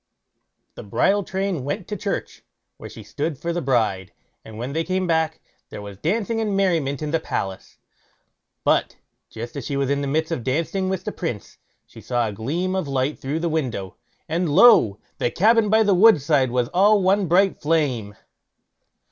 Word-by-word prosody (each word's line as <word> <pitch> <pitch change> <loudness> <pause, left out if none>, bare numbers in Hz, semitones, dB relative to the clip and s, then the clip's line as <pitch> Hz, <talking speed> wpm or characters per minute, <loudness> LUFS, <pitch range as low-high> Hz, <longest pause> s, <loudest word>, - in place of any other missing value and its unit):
The - - -9
bridal 200 - +1
train 190 -6 -2
went 165 +7 -4
to 210 - -3
church, 200 0 -4 0.3
where - - -9
she - - -11
stood 150 0 -4
for 170 +5 -3
the 175 - -2
bride, 110 - 0 0.3
and 110 -1 -11
when 125 +4 -5
they 165 +2 0
came 185 +1 -1
back, 160 -2 0 0.3
there - - -8
was 100 -1 -10
dancing 225 +6 -1
and 205 -3 -1
merriment 160 -7 0
in 150 - -3
the 165 - +1
palace. 95 -10 -5 0.9
But - - +1 0.3
just 115 +4 -8
as 140 - -5
she 140 +4 -3
was 140 0 0
in 140 0 0
the 140 - -2
midst 160 +4 -1
of 135 -8 -2
dancing 165 - -1
with 190 -1 -3
the 210 - -4
Prince, 140 - -6 0.3
she - - -14
saw 120 -2 -1
a - - -4
gleam 165 - -2
of 185 -5 -2
light 135 +1 -1
through 145 +5 -3
the 170 - 0
window, 130 - -3 0.3
and 170 +1 -1
lo! 150 - +6 0.2
the - - +1
cabin 220 - +3
by 220 +1 +4
the 205 -2 +3
wood 195 -1 +6
side 140 -2 +2
was 125 0 0
all 200 +2 +4
one 195 +1 +2
bright 190 +4 +2
flame. 140 -10 0
160 Hz, 190 wpm, -22 LUFS, 130-190 Hz, 0.9 s, lo